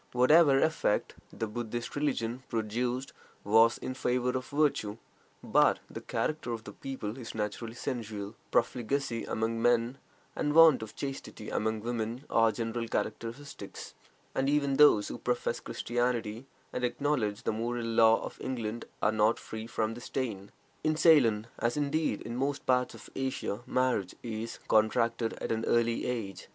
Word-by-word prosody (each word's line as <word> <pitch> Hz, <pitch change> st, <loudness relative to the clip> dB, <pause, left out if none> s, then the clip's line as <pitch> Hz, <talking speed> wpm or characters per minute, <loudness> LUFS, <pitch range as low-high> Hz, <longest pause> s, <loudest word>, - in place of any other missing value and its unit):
Whatever 135 Hz, +3 st, +6 dB
effect 160 Hz, -9 st, +1 dB, 0.2 s
the 115 Hz, -, -3 dB
Buddhist 120 Hz, +1 st, -4 dB
religion 130 Hz, -4 st, -1 dB
produced 120 Hz, +3 st, -2 dB, 0.3 s
was 110 Hz, +2 st, +5 dB
in 130 Hz, -, -4 dB
favor 125 Hz, -1 st, 0 dB
of 130 Hz, 0 st, -3 dB
virtue, 140 Hz, -8 st, +1 dB, 0.5 s
but -, -, +4 dB
the -, -, -6 dB
character 155 Hz, -6 st, -2 dB
of 115 Hz, -1 st, -5 dB
the -, -, -8 dB
people 130 Hz, -3 st, -6 dB
is 115 Hz, -, -7 dB
naturally 110 Hz, +2 st, -3 dB
sensual; 110 Hz, -6 st, -4 dB, 0.2 s
profligacy 120 Hz, 0 st, 0 dB
among 115 Hz, +1 st, -1 dB
men 120 Hz, +2 st, +2 dB, 0.4 s
and 150 Hz, -1 st, 0 dB
want 165 Hz, -5 st, +8 dB
of 110 Hz, -, -8 dB
chastity 135 Hz, -6 st, -6 dB
among 110 Hz, 0 st, -1 dB
women 115 Hz, +2 st, -3 dB
are 115 Hz, -1 st, +4 dB
general 115 Hz, +1 st, -3 dB
characteristics, 115 Hz, +6 st, -5 dB, 0.4 s
and 135 Hz, +1 st, +1 dB
even 140 Hz, -2 st, +2 dB
those 145 Hz, -8 st, +6 dB
who -, -, -6 dB
profess 120 Hz, -1 st, -1 dB
Christianity 120 Hz, 0 st, -2 dB, 0.3 s
and 125 Hz, -, -3 dB
acknowledge 120 Hz, -4 st, 0 dB
the -, -, +1 dB
moral 120 Hz, +2 st, -2 dB
law 115 Hz, 0 st, +4 dB
of -, -, -8 dB
England 115 Hz, -3 st, -3 dB, 0.2 s
are 105 Hz, -, +4 dB
not 110 Hz, +1 st, +3 dB
free 110 Hz, 0 st, -7 dB
from 110 Hz, -1 st, -1 dB
this 120 Hz, +1 st, -9 dB
stain. 105 Hz, -7 st, -3 dB, 0.3 s
In 155 Hz, 0 st, +2 dB
Ceylon, 135 Hz, -10 st, +5 dB
as, 120 Hz, +4 st, 0 dB
indeed, 145 Hz, -4 st, 0 dB
in 115 Hz, -, -5 dB
most 135 Hz, +2 st, -1 dB
parts 125 Hz, -1 st, +2 dB
of -, -, -13 dB
Asia, 130 Hz, -6 st, -2 dB
marriage 125 Hz, -8 st, 0 dB
is 115 Hz, -1 st, -4 dB
contracted 115 Hz, +1 st, +2 dB
at -, -, -4 dB
an 115 Hz, 0 st, 0 dB
early 115 Hz, 0 st, +2 dB
age. 115 Hz, -6 st, -4 dB
120 Hz, 150 wpm, -30 LUFS, 110-130 Hz, 0.5 s, want